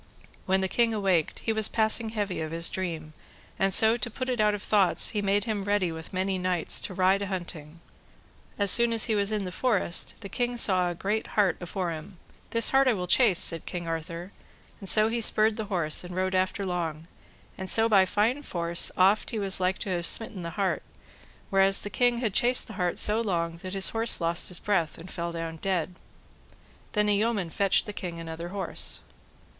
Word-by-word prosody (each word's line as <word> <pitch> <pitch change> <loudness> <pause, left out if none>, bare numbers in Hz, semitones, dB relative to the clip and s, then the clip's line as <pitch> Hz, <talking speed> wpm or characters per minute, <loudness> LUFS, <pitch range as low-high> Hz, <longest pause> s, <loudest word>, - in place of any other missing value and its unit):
When 190 0 +2
the 190 - 0
king 230 +3 +1
awaked, 190 -6 0
he 225 - 0
was 220 -1 +1
passing 220 0 +1
heavy 205 -6 -3
of 155 - -4
his 165 +1 -1
dream, 165 -4 -5 0.5
and 195 0 +2
so 220 +4 +5
to 240 - -2
put 255 +3 -5
it 245 -3 0
out 210 -1 +3
of 205 - -8
thoughts, 200 -4 +3
he 210 - -2
made 200 0 +1
him 215 -3 -3
ready 200 -3 0
with 160 0 -9
many 190 0 -1
knights 180 -2 +2
to 185 - -4
ride 190 +2 +2
a 200 - -3
hunting. 170 -4 -6 0.8
As 200 -2 +3
soon 235 -1 +4
as 225 - +1
he 225 - 0
was 205 0 0
in 210 -2 -1
the 180 - -5
forest 200 -4 0
the 200 - -7
king 245 +4 -2
saw 185 -5 +3
a 175 - -5
great 205 +5 -2
hart 195 -5 +3
afore 175 0 -3
him. 165 +4 -9 0.3
This 230 -1 +3
hart 270 0 +4
will 210 -8 +1
I - - -2
chase, 200 0 +4
said 165 -1 +2
King 175 -2 -5
Arthur, 165 +3 -5 0.5
and 195 - -1
so 215 0 +5
he 230 +1 -1
spurred 215 0 +3
the 220 - -4
horse, 175 -7 -1
and 175 0 -8
rode 185 0 -1
after 185 +2 0
long, 165 -4 -3 0.5
and 190 0 -6
so 225 0 +4
by 195 -4 +4
fine 230 +9 0
force 170 -9 +2
oft 195 +3 +3
he 225 - -3
was 195 -2 +2
like 185 +1 0
to 200 - -5
have 175 -2 -1
smitten 215 -2 +1
the 170 - -5
hart; 195 -2 0 0.7
whereas 195 0 +3
the 205 - -7
king 245 +3 +2
had 230 -5 -2
chased 245 +4 +3
the 220 - -10
hart 180 -3 -2
so 215 +2 +2
long, 170 -6 -2
that 185 +2 -7
his 195 - +3
horse 225 0 0
lost 170 0 0
his 180 - -3
breath, 185 -6 -1
and 170 +3 -10
fell 170 -1 -4
down 165 -1 -5
dead. 180 0 -2 1.0
Then 210 -1 +1
a 205 - +3
yeoman 205 -5 -1
fetched 195 +2 +2
the 210 - -7
king 175 -4 -6
another 165 +1 -7
horse. 190 -2 -2
195 Hz, 215 wpm, -27 LUFS, 175-215 Hz, 1.0 s, so